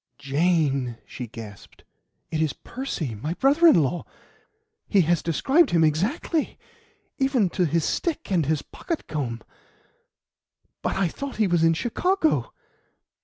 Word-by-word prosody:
"Jane!" 140 -4 +1
she 125 - -7
gasped, 110 -3 -11 0.5
"it 160 -1 -1
is 155 -3 +1
Percy 205 - -5
my 150 +11 -4
brother 290 - +4
in 260 - +6
law! 170 +6 -2 0.8
He 200 - +4
has 170 0 +2
described 265 - +3
him 165 -2 +3
exactly, 210 - 0 0.6
even 265 -9 +2
to 180 -1 +1
his 165 +1 +1
stick 325 - -2
and 165 -6 +2
his 155 -2 0
pocket 335 -3 -5
comb. 120 -7 -4 1.4
But - - -1
I 195 - +2
thought 275 - -6
he 220 - +2
was 175 -3 +2
in 165 0 +4
Chicago." 320 - 0
170 Hz, 135 wpm, -25 LUFS, -, 1.4 s, in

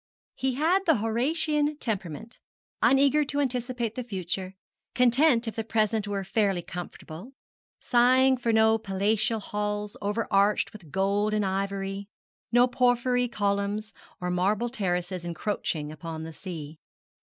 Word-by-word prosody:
He 265 -1 -1
had 350 +7 +2
the 320 - +6
Horatian 295 +7 0
temperament, 205 - -4 0.4
uneager 280 +2 +4
to 285 - -1
anticipate 245 -4 -1
the 250 - -4
future, 190 -3 -4 0.4
content 250 0 +4
if 225 - -4
the 225 - -2
present 215 -1 0
were 200 -1 -2
fairly 195 -3 0
comfortable, 180 +5 -8 0.5
sighing 255 +2 +4
for 235 -2 0
no 220 0 +4
palatial 210 +2 0
halls 210 0 -3
over 210 +3 -1
arched 200 +1 +3
with 190 -7 -12
gold 200 +2 +1
and 210 -1 +1
ivory, 195 +1 -2 0.4
no 245 +1 +6
porphyry 245 0 +2
columns, 205 0 -1 0.3
or 180 0 -2
marble 200 +6 +1
terraces 180 -4 -2
encroaching 170 -3 -3
upon 160 +1 -6
the 160 0 -7
sea. 155 -4 -8
215 Hz, 130 wpm, -27 LUFS, 195-245 Hz, 0.5 s, the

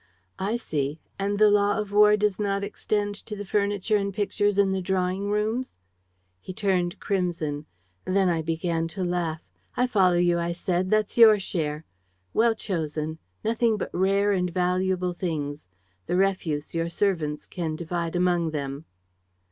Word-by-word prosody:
"'I 205 +4 0
see. 150 -9 -2 0.2
And 200 +1 0
the 210 0 +6
law 205 +1 +3
of 210 -2 -3
war 210 0 +6
does 210 -1 0
not 200 -1 0
extend 205 0 -1
to 210 - -5
the 205 0 -6
furniture 205 +1 +1
and 200 -1 -1
pictures 205 +1 0
in 200 -1 +4
the 190 0 -1
drawing 185 +2 -1
rooms?' 215 +5 -1 0.6
"He 185 - -8
turned 185 -4 0
crimson. 165 -6 -2 0.4
Then 190 0 +2
I 170 -2 +1
began 165 +1 -1
to 190 - -1
laugh: 175 -3 -2 0.3
"'I 250 - +3
follow 190 -7 +3
you,' 175 0 +3
I 170 0 -1
said. 180 +1 -1
'That's 215 +1 +1
your 220 -2 +8
share. 155 -5 -3 0.5
Well 230 0 +3
chosen. 160 -5 -3 0.3
Nothing 225 0 +2
but - - -4
rare 195 +3 +2
and 180 -2 +1
valuable 180 0 0
things. 150 - -4 0.4
The - - 0
refuse 180 -6 0
your 165 0 -1
servants 165 -5 -1
can 165 -3 -4
divide 170 +1 -3
among 175 -2 +2
them.' 140 0 -4
185 Hz, 155 wpm, -26 LUFS, 170-205 Hz, 0.6 s, your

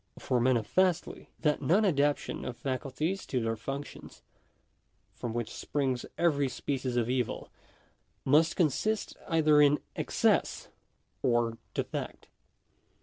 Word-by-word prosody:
For 125 - 0
manifestly, 130 - +1
that 150 -3 +1
non 180 +10 +3
adaptation 145 -5 +1
of 120 - -5
faculties 140 +8 -2
to 130 - 0
their 115 -1 -1
functions, 135 +6 -7 0.9
from 120 +3 -5
which 115 -1 -3
springs 130 -4 -2
every 145 -5 +2
species 130 -1 -3
of 115 -2 +1
evil, 125 -1 -2 0.7
must 155 +5 +4
consist 200 - 0
either 155 -3 +4
in 145 0 +5 0.2
excess - - +1 0.5
or 120 -2 +1 0.2
defect. - - -4
140 Hz, 110 wpm, -30 LUFS, 125-155 Hz, 0.9 s, in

